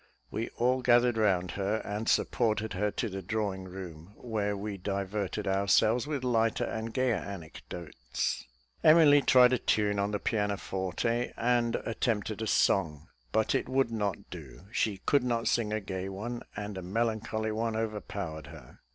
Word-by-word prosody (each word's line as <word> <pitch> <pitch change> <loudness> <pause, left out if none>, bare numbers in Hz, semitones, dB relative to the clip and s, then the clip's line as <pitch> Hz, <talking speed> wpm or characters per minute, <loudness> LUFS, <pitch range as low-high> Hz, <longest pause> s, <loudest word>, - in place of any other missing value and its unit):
We 115 +2 -3
all 125 +2 +2
gathered 120 -1 +4
round 95 -5 +2
her, 100 +2 -1
and 105 +2 -2
supported 110 -3 +1
her 105 +3 0
to 115 - -2
the 95 -2 -5
drawing 100 -1 -2
room, 90 0 -9
where 105 -4 -2
we 100 0 -4
diverted 100 +1 -3
ourselves 105 +6 +3
with 145 -4 -2
lighter 115 -3 +2
and 110 +1 -3
gayer 130 -1 +1
anecdotes. 80 -7 -5 0.4
Emily 155 -2 +7
tried 125 -2 +6
a 125 - +2
tune 105 -1 +1
on 100 +1 +1
the 105 - -1
pianoforte, 105 +2 -1
and 120 0 +2
attempted 110 -2 -1
a 110 - -2
song; 80 -7 +1 0.2
but 110 - +2
it - - 0
would 130 -2 +2
not 105 -6 -1
do: - - -9
she 105 -4 0
could 140 -3 +3
not 120 -2 0
sing 110 -3 +1
a 110 - 0
gay 95 -1 -4
one, 115 +5 -5
and 105 -2 -5
a - - -6
melancholy 110 +2 -1
one 110 +1 -1
overpowered 100 -8 -4
her. 75 -6 -13
105 Hz, 160 wpm, -30 LUFS, 95-115 Hz, 0.4 s, Emily